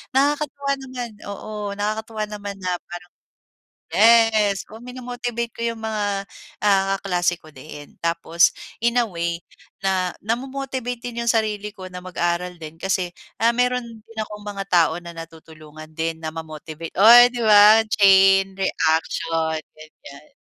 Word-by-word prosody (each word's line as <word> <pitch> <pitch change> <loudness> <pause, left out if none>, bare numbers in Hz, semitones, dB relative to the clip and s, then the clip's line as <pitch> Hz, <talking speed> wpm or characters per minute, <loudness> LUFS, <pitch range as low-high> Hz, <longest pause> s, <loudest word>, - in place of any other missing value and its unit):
nakakatuwa 280 0 +1
naman, 255 -3 -6 0.2
oo, 210 0 -6
nakakatuwa 215 +1 -3
naman 205 -1 -7
na 185 -1 -2 0.2
parang. 175 +1 -9 0.8
Yes, 220 -3 +4
oo 220 - -10
minomotivate 245 -1 -5
ko - - -8
'yong 230 0 -2
mga 205 -3 -2 0.7
kaklase 180 -2 0
ko 155 - -16
din, 145 +1 -11
tapos 170 0 +3 0.3
in 235 +1 +2
a 240 - +2
way 170 -3 -3 0.5
na, 185 -2 0
namo-motivate 255 +1 -3
din 235 -1 -4
'yong 235 - 0
sarili 210 -2 -1
ko 190 -2 -9
na 180 - -7
mag-aral 180 0 -2
din. 155 -1 -9
Kasi, 185 -2 -1 0.3
ah 230 +1 +5
meron 250 0 +1
din 225 -1 -14
akong 210 0 -10
mga 200 -1 -4
tao 170 -2 +4
na 170 -1 -10
natutulungan 155 -1 -12
din 165 0 -2
na 160 - -2
ma-motivate, 160 0 -8
o 200 - +6 0.3
'di 240 -1 -4
ba 215 +1 +7
chain 195 -1 +5
reaction, 160 -2 0 0.2
ganyan. 150 -1 -15
200 Hz, 140 wpm, -22 LUFS, 170-230 Hz, 0.8 s, ba